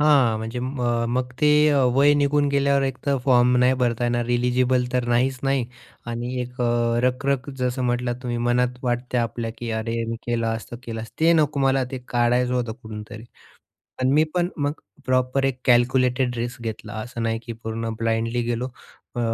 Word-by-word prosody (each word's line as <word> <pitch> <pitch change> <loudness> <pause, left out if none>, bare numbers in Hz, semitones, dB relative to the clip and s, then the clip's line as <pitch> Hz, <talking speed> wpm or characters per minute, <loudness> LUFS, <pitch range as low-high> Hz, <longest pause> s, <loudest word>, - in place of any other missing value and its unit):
हां, 140 -7 +4
म्हणजे 115 +2 -5
म 130 +1 -4 0.3
मग 125 0 -1
ते 150 - +5 0.2
अ, 140 -2 +3
वय 140 +2 +5
निघून 145 0 +2
गेल्यावर 140 0 +2
एकतर 135 +1 -1
फॉर्म 125 -1 +4
नाही 125 +1 +4
भरता 120 -1 +1
येणार 120 0 0
एलिजिबल 125 +1 +2
तर 125 -1 +1
नाहीच 130 +2 +2
नाही 135 -2 +1 0.4
आणि 120 +2 -4
1 125 +1 -6
अ, 120 -1 +1
रख 125 +2 0
रख 140 -1 0
जसं 125 +1 -1
म्हटलात 120 0 0
तुम्ही 120 -2 -2
मनात 125 +1 +1
वाटते 120 -2 -1
की 120 -1 -4
"अरे 115 +1 -2
मी 115 - -2
केलं 120 -1 0
असतं, 115 +1 -4
केलं 115 -3 -5
असतं" 115 - -11
ते 165 +1 +5
नको 150 -3 +2
मला 135 -1 +2
ते 130 - -4
काढायचं 125 +1 +2
होतं 120 -3 -1
कुठूनतरी. 110 0 -8 0.8
पण 130 0 +2
मी 155 +2 +5
पण 175 -1 +1
मग 145 -1 0 0.3
प्रॉपर 130 +1 +1
1 135 -2 -1
कॅल्क्युलेटेड 125 0 +3
रिस्क 120 0 -4
घेतला, 110 -2 -6
असं 115 +1 -5
नाही 115 0 0
की 115 - -6
पूर्ण 115 0 -4
ब्लाइंडली 115 +1 0
गेलो. 120 +1 -2 0.5
अ, - - -2
125 Hz, 180 wpm, -23 LUFS, 120-130 Hz, 0.8 s, ते